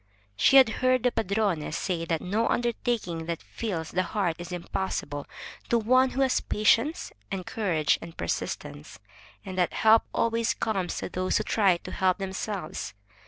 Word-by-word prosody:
She 270 - +5
had 265 -4 +8
heard 255 -1 +3
the 250 - +3
padrone 200 -7 0
say 175 -3 -2
that 165 -1 -1
no 215 +5 0
undertaking 230 -8 -1
that 170 -1 -4
fills 175 -8 -4
the 185 - +1
heart 185 -2 -1
is 175 +1 -7
impossible 170 -5 -4 0.4
to 235 - +4
one 255 +4 +4
who 265 - -2
has 265 -1 +3
patience 230 +8 +1 0.2
and 185 -2 -4
courage 170 -10 +1
and 165 0 -10
persistence, 75 -3 -4 0.5
and 185 -1 -5
that 180 - +1
help 220 +1 +5
always 230 0 +1
comes 195 -5 -2
to - - -4
those 185 0 0
who - - -1
try 195 -5 +3
to - - -10
help 185 -1 +1
themselves. 190 - -4
195 Hz, 165 wpm, -27 LUFS, 170-230 Hz, 0.5 s, had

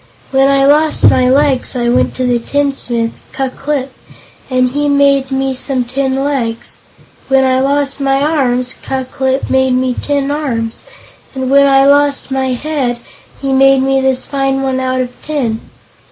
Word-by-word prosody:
When 270 0 +3
I 275 0 +3
lost 300 +2 +4
my 255 0 +2
legs 270 -1 +2
I 240 -1 -1
went 240 - +1
to 255 - -2
the 245 -1 +1
tinsmith, 245 -3 -2
Ku 270 -1 -2
Klip, 275 -1 -3 0.6
and 255 -1 +1
he 290 +2 -1
made 280 -1 +2
me 270 0 -1
some 260 0 -1
tin 265 +2 -2
legs. 240 -5 -2 0.5
When 270 0 +3
I 260 0 +2
lost 280 +1 0
my 270 0 +1
arms, 260 -4 0
Ku 265 -1 -3
Klip 265 +1 -2
made 265 -1 +2
me 255 0 0
tin 285 +1 -2
arms, 240 -7 -3 0.5
and 260 0 -3
when 280 0 +5
I 270 0 +4
lost 285 -1 +2
my 265 0 0
head 260 -2 -2 0.4
he 275 -1 -2
made 270 0 +4
me 270 0 +1
this 265 -1 0
fine 270 -1 -1
one 265 -1 -1
out 255 0 -1
of 250 -1 -4
tin. 250 -8 -2
270 Hz, 170 wpm, -14 LUFS, 255-280 Hz, 0.6 s, when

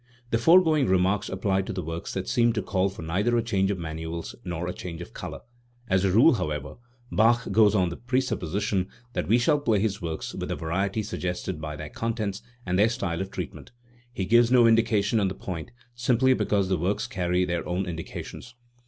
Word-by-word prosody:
The 115 - +2
foregoing 160 -2 +5
remarks 95 +2 +2
apply 95 0 0
to 95 - -5
the 90 -1 -4
works 80 +3 -5
that 95 -1 -3
seem 120 -1 +3
to 110 - -2
call 95 -1 +1
for 95 -3 -9
neither 100 +9 +1
a 115 - +1
change, 100 -4 +1
of 100 - -1
manuals 80 0 -5
nor 90 -1 -4
a 90 - -3
change 85 -3 -7
of 85 - -9
colour. - - -7 0.5
As 95 -2 +2
a 95 - +2
rule, 120 - +6
however, 75 - -3 0.3
Bach 115 0 +3
goes 105 0 +5
on 90 -3 +2
the 85 - -6
presupposition 105 -6 -1 0.3
that - - -2
we 115 - +5
shall 145 +5 +3
play 115 -8 +2
his 105 0 -1
works 80 -2 -4
with - - -5
the - - -1
variety 95 +6 -1
suggested 90 -4 -4
by 75 -1 -5
their 75 0 -7
contents 110 -2 -3 0.2
and 90 +1 0
their 105 +2 +5
style 85 -6 -2
of 95 - -4
treatment. 90 - -7 0.4
He 95 -6 -3
gives 120 +3 +5
no 125 -2 +6
indications 115 -1 +3
on 100 - +2
the 95 - -4
point, 85 -4 -6 0.2
simply 120 +2 +3
because 100 -6 +1
the 95 -2 0
works 95 +5 0
carry 90 -1 0
their 85 -2 -2
own 90 +2 -1
indications. 90 +7 -7
95 Hz, 205 wpm, -26 LUFS, 90-115 Hz, 0.5 s, rule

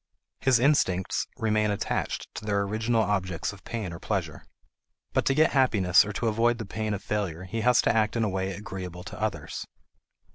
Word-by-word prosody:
His 130 -2 +4
instincts 115 -9 +2
remain 110 -1 +1
attached 100 - -2
to - - -7
their 100 -1 +1
original 110 +3 +1
objects 95 -3 -1
of 100 - -15
pain 105 -7 -4
or 85 - -8
pleasure. - - -3 0.7
But - - +1
to 135 - +2
get 155 +2 +4
happiness 105 -10 +4
or 105 - -5
to 115 - -1
avoid 115 +2 +2
the 115 - -5
pain 110 +1 -2
of 100 - -8
failure 95 -5 -2
he 100 +5 -3
has 125 +2 +4
to - - +2
act 110 0 +2
in 115 - +1
a 105 - +1
way 95 0 -2
agreeable 90 -2 -7
to - - -9
others. - - -3
105 Hz, 190 wpm, -27 LUFS, 95-115 Hz, 0.7 s, His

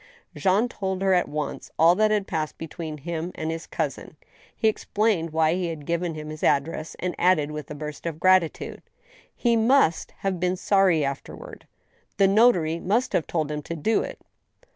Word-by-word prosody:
Jean 200 +5 +2
told 190 -4 -3
her 190 -1 +3
at 180 - +2
once 150 0 -4
all 165 +2 +6
that 215 +3 +3
had 210 -2 +1
passed 155 -4 -3
between 160 -1 -6
himself 165 +3 -5
and, 160 0 -3
his 165 +1 -6
cousin. - - -4 0.4
He 220 - +1
explained 210 -5 0
why 160 0 +2
he 180 -1 -1
had 160 -3 -6
given 170 0 -1
him 155 0 -7
his 155 - -8
address, 155 +3 0
and 180 -1 -2
added, 165 -5 +3
with 150 -1 -7
a 150 - -6
burst 150 +2 -6
of 160 -2 -5
gratitude: 185 -3 +2 0.5
"He 235 -1 +2
must 225 - +3
have 190 -2 -1
been 180 +1 +1
sorry 185 -5 +3
afterward;... 140 0 -7 0.5
the 195 -1 +5
notary 190 -6 +4
must 220 +9 0
have 160 - +1
told 155 -3 -1
him 150 0 -3
to 170 - -6
do 215 +8 +1
it. - - -6
170 Hz, 185 wpm, -25 LUFS, 155-195 Hz, 0.5 s, all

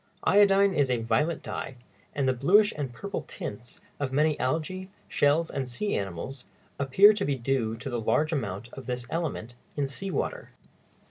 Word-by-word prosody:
Iodine 200 -1 +5
is 145 -5 +2
a 125 - +2
violet 150 +9 0
dye, 135 - -5 0.4
and 140 -2 +1
the 130 - +3
bluish 195 - +4
and 140 -4 -3
purple 200 - -5
tints 130 - -7 0.2
of 140 -2 -2
many 150 +2 +3
algæ, 165 +8 -2 0.2
shells, 150 +3 +2
and 135 -2 -3
sea 205 +12 -2
animals 100 +8 -4 0.4
appear 190 +10 +6
to 205 -1 -2
be 145 - 0
due 120 -3 -1
to 140 - -7
the 120 -3 -2
large 155 +8 +1
amount 115 -5 -3
of 135 -3 -9
this 125 -1 -3
element 160 -8 -3 0.2
in 145 - 0
sea 140 +9 -5
water. - - -3
140 Hz, 175 wpm, -28 LUFS, 125-175 Hz, 0.4 s, appear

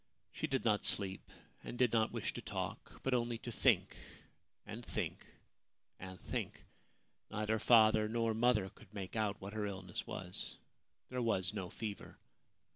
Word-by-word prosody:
She - - -2
did 135 -2 0
not 105 -2 +3
sleep, 95 -1 +4 0.3
and - - -6
did 125 -2 +3
not 110 -1 +3
wish - - -2
to - - -5
talk, - - -5
but 135 - +1
only 120 -1 +1
to 120 - -6
think, - - +3 0.7
and 110 +3 -7
think, - - -3 0.7
and 95 0 -8
think. - - -4 0.7
Neither 110 +1 0
father 110 -1 +6
nor 115 0 +1
mother 110 -4 +3
could 110 -5 -17
make 95 0 -5
out 105 -2 0
what 100 +2 -7
her 105 -1 -1
illness 95 -2 -5
was. 90 -1 -5 0.5
There 125 -1 -1
was 95 -4 +1
no 95 -4 -3
fever. 105 -3 -6
110 Hz, 155 wpm, -36 LUFS, 100-115 Hz, 0.7 s, father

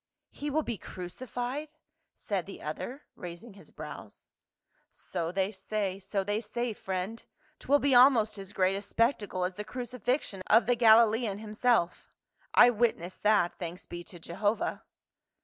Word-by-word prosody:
"He 295 - -5
will 310 +2 +1
be 235 -8 -4
crucified?" 245 - -5 0.5
said - - -3
the - - -9
other, 270 +4 -5
raising 180 +6 -9
his 195 - -16
brows. - - -10 0.4
" - - -43 0.2
So 165 0 -1
they 190 +2 0
say, 195 -1 -3
so 195 0 -2
they 205 +2 -1
say, 240 0 -3
friend; 190 +3 -4 0.4
'twill 285 - +3
be 285 -1 +2
almost 245 -5 +6
as 195 0 -8
great 190 0 +2
a 200 - -3
spectacle 205 -3 0
as 180 0 -2
the 210 - -3
crucifixion 245 -2 -3
of 225 +2 +6
the 245 - +3
Galilean 225 -2 +5
himself 215 -3 0 0.4
I 245 0 +7
witnessed 215 -6 -1
that, 200 -5 +3
thanks 175 0 -6
be 175 0 -7
to 175 - -11
Jehovah." 205 +6 -1
215 Hz, 150 wpm, -30 LUFS, 190-245 Hz, 0.5 s, I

